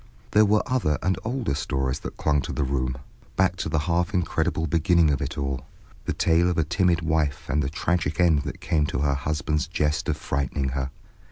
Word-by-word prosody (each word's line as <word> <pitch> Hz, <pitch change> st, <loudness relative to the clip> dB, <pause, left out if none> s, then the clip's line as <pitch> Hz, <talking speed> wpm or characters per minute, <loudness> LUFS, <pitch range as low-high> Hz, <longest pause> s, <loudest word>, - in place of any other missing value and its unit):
There 105 Hz, +1 st, +6 dB
were 105 Hz, +1 st, +3 dB
other 110 Hz, -, +1 dB
and 95 Hz, 0 st, +1 dB
older 120 Hz, -, -1 dB
stories 65 Hz, -2 st, -1 dB
that -, -, -7 dB
clung 75 Hz, -2 st, +2 dB
to -, -, -5 dB
the 75 Hz, -, -1 dB
room, 65 Hz, -2 st, -1 dB, 0.4 s
back 95 Hz, -1 st, +2 dB
to 80 Hz, -, -3 dB
the 80 Hz, -, 0 dB
half 90 Hz, +3 st, 0 dB
incredible 85 Hz, -2 st, 0 dB
beginning 80 Hz, +1 st, +3 dB
of 70 Hz, -, -1 dB
it -, -, -4 dB
all, 70 Hz, -2 st, -3 dB, 0.4 s
the -, -, -1 dB
tale 85 Hz, +2 st, +3 dB
of 90 Hz, -, -1 dB
a 80 Hz, -, +3 dB
timid 85 Hz, +2 st, +2 dB
wife 80 Hz, -3 st, 0 dB
and 75 Hz, +1 st, +1 dB
the 65 Hz, -, -1 dB
tragic 80 Hz, 0 st, -1 dB
end 85 Hz, -5 st, +4 dB
that -, -, -6 dB
came 75 Hz, -3 st, +1 dB
to 75 Hz, -, -2 dB
her 70 Hz, -1 st, +2 dB
husband's 75 Hz, +1 st, -1 dB
jest 75 Hz, 0 st, 0 dB
of -, -, 0 dB
frightening 70 Hz, 0 st, -1 dB
her. 65 Hz, 0 st, -2 dB
75 Hz, 205 wpm, -25 LUFS, 70-85 Hz, 0.4 s, There